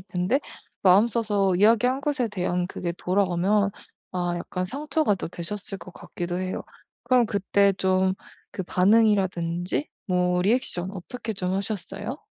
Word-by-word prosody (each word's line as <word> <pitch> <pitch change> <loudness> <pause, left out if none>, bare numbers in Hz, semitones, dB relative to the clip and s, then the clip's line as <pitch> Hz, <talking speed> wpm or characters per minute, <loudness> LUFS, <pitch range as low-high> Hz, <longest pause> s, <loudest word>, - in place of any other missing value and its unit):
텐데 185 +8 0 0.4
마음 195 +4 +6
써서 205 -5 +1
이야기한 230 +7 +4
것에 280 -5 0
대한 180 -2 -1
그게 175 -2 -4
돌아오면 195 +2 +2 0.4
아 175 -1 -1
약간 180 +1 -3
상처가 285 - 0
또 185 - -5
되셨을 195 +4 -6
것 185 - -12
같기도 175 +1 -5
해요. 185 0 -3 0.4
그럼 245 -1 +3
그때 200 0 +2
좀 190 0 +2 0.4
그 190 - -1
반응이라든지 185 - +2 0.2
뭐 180 -1 +2
리액션 195 -4 0
어떻게 220 +4 -6
좀 185 -2 -2
하셨어요? 205 - -4
195 Hz, 290 characters per minute, -25 LUFS, 180-220 Hz, 0.4 s, 마음